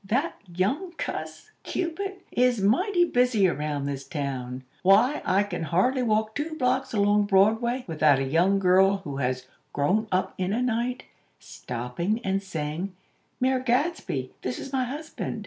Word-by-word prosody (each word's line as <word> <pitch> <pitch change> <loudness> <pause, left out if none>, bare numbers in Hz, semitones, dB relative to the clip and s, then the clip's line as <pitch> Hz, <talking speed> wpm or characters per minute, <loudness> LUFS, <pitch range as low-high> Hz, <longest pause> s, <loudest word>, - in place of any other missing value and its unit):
That 270 +11 -1
young 215 - -1
cuss, 160 - -6
Cupid, 385 +3 -3
is 250 -2 +2
mighty 350 - +3
busy 245 - +3
around 150 -4 -2
this 140 -1 -3
town! 130 -4 -4 0.2
Why, 210 +10 +4
I 195 +2 +3
can 185 -4 -5
hardly 185 - +1
walk 220 -2 +1
two 315 +4 -3
blocks 260 -1 0
along 205 -1 +3
Broadway, 225 +6 +3
without 155 -4 +3
a 135 - 0
young 170 +8 +3
girl, 195 +1 +4
who 140 -6 -5
has 130 -1 -1 0.3
'grown 190 +10 +1
up 185 0 0
in 185 +1 0
a 235 - 0
night,' 245 +1 -1 0.3
stopping, 125 - -4
and 195 0 0
saying: 175 0 -4 0.4
'Mayor 260 0 +2
Gadsby, 255 - -1
this 125 0 -3
is 270 - -8
my 260 -1 +1
husband.' 285 -3 -5
200 Hz, 150 wpm, -26 LUFS, 160-250 Hz, 0.4 s, Why